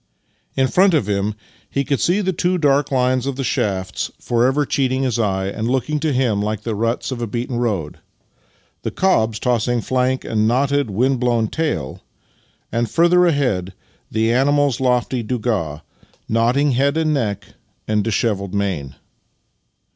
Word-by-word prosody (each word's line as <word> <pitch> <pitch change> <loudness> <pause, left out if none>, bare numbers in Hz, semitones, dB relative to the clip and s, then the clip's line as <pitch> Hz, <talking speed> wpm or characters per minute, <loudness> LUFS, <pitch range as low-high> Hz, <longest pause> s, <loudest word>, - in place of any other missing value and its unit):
In 130 0 +3
front 185 +4 +4
of 120 -10 +1
him 100 +1 -1 0.3
he 140 - -1
could 140 0 0
see 185 +4 +2
the 190 -1 0
two 180 +1 0
dark 145 -3 +2
lines 130 0 +1
of 140 - -2
the 135 - -3
shafts 95 -6 -1
forever 130 +5 +1
cheating 130 -1 0
his 120 -3 0
eye, 95 -3 0
and 110 +3 -3
looking 135 +4 0
to 155 0 0
him 125 -6 +1
like 105 0 -3
the 115 - -2
ruts 115 +5 -1
of 125 -2 -4
a 120 - -2
beaten 120 +3 -3
road; 100 -11 -2 0.8
the - - -2
cob's 115 - +1
tossing 120 0 0
flank 130 +2 0
and 110 -1 +1
knotted, 140 +2 +1
wind 125 +6 +1
blown 120 -3 +1
tail; 150 - -3 0.7
and, 115 0 0
further 175 +4 +4
ahead, 105 - 0 0.3
the 110 +1 +1
animal's 140 0 +2
lofty 125 -1 +1
donga, 105 -10 -2 0.4
nodding 120 +6 +2
head 140 +4 +1
and 155 -1 +1
neck, 105 -7 -2 0.4
and 105 -1 +1
dishevelled 100 -3 -1
mane. 90 -10 -2
120 Hz, 155 wpm, -20 LUFS, 110-140 Hz, 0.8 s, front